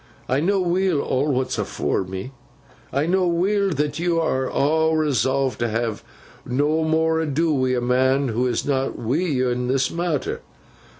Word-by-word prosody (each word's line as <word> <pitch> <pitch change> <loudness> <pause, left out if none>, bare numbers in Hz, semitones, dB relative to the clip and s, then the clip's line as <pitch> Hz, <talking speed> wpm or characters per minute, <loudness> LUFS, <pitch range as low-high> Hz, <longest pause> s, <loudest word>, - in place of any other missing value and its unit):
I 130 - +1
know 195 +6 +1
weel, 180 -2 +1
aw 135 +3 0
what's 130 -1 -1
afore - - -1
me. 95 +7 -6 0.6
I 140 +2 0
know 180 +2 +2
weel 195 +4 +1
that 150 -2 -1
yo 170 0 +1
aw 160 +2 +1
resolve 135 -3 +1
to 120 -1 0
ha 115 -1 -2 0.4
nommore 160 +4 +1
ado 160 +1 0
wi' 130 -2 +1
a - - -1
man 130 +2 +2
who 120 +3 0
is 120 -2 -1
not 135 -1 -1
wi' 120 +5 -1
yo 135 -8 0
in 125 0 -2
this 130 +1 +1
matther. 170 -4 -2
145 Hz, 160 wpm, -22 LUFS, 130-160 Hz, 0.6 s, know